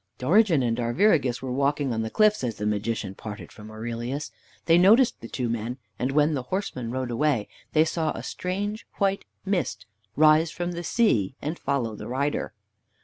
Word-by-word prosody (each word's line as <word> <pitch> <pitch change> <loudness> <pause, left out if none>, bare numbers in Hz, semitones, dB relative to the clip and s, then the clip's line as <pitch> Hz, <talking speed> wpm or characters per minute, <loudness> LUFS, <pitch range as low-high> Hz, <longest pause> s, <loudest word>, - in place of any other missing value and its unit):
Dorigen 170 - +4
and 115 -1 0
Arviragus 130 - +2
were 130 - -3
walking 140 0 0
on 110 - -1
the 110 - -2
cliffs 215 - +3
as 115 -3 -1
the 105 - -4
Magician 105 -1 -1
parted 105 +1 -8
from 105 0 -12
Aurelius. 120 +6 -4 0.3
They 165 +1 +5
noticed 225 +7 +5
the 115 - -7
two 125 +1 -3
men, 115 +2 -3 0.2
and 130 +2 0
when 150 +2 +3
the 135 - -1
horseman 185 - -3
rode 130 0 -3
away 120 -3 +1 0.3
they 155 0 +5
saw 160 -1 -1
a - - -7
strange 205 +4 -4
white 195 -1 0 0.2
mist 195 -2 -1 0.3
rise 155 +2 +5
from 175 +2 -3
the 175 0 -5
sea 135 - +2
and 155 +4 -4
follow 120 -6 -1
the - - -8
rider. 140 +2 -1
140 Hz, 180 wpm, -26 LUFS, 115-175 Hz, 0.3 s, They